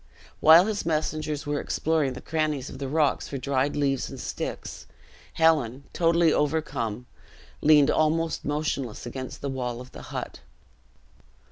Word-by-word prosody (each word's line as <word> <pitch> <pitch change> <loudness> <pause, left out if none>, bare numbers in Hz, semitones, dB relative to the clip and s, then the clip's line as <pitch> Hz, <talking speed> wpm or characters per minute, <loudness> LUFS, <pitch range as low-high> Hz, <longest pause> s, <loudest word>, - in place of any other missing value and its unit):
While 165 +4 +8
his 210 -1 -2
messengers 155 -2 -2
were 145 0 -1
exploring 155 -4 0
the - - -9
crannies 155 -4 -2
of - - -9
the 135 - -3
rocks 150 +1 +1
for 140 - -5
dried 135 +1 0
leaves 135 -3 0
and 135 - -8
sticks, - - -5 0.5
Helen, 145 -6 +2
totally 170 -1 +3
overcome, 135 -7 -1 0.6
leaned 150 -2 +6
almost 160 +1 +1
motionless 145 -6 -2
against 130 +1 -7
the 140 - -3
wall 125 -3 -3
of 125 0 -11
the - - -10
hut. - - -5
145 Hz, 140 wpm, -26 LUFS, 130-155 Hz, 0.6 s, While